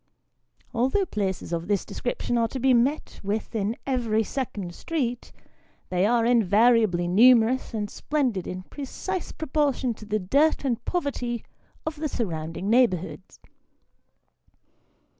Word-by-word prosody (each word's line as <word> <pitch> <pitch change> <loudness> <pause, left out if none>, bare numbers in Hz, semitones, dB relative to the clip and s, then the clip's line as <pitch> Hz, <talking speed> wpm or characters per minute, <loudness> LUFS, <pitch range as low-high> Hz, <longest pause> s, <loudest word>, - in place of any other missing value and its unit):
Although 265 - +1
places 190 - -3
of 170 0 -2
this 200 -2 0
description 245 0 -3
are 230 -1 +2
to 260 - -5
be 260 +1 +4
met 260 +6 +1
with 205 +3 -3
in 220 0 -1
every 230 -5 +1
second 205 -8 -4
street, 245 - -3 0.6
they 185 +2 +2
are 235 0 +3
in 235 -1 +4
variably 210 -3 +4
numerous 235 +5 +5
and 215 -3 -2
splendid 250 - -1
in 185 0 -5
precise 320 - -5
proportion 280 -5 0
to 215 - -12
the 215 0 +1
dirt 280 +11 +2
and 240 -3 -1
poverty 255 -9 -2 0.4
of 315 -1 -3
the 305 0 -2
surrounding 165 -6 -3
neighbourhood. 210 -7 +2
235 Hz, 130 wpm, -26 LUFS, 200-265 Hz, 0.6 s, numerous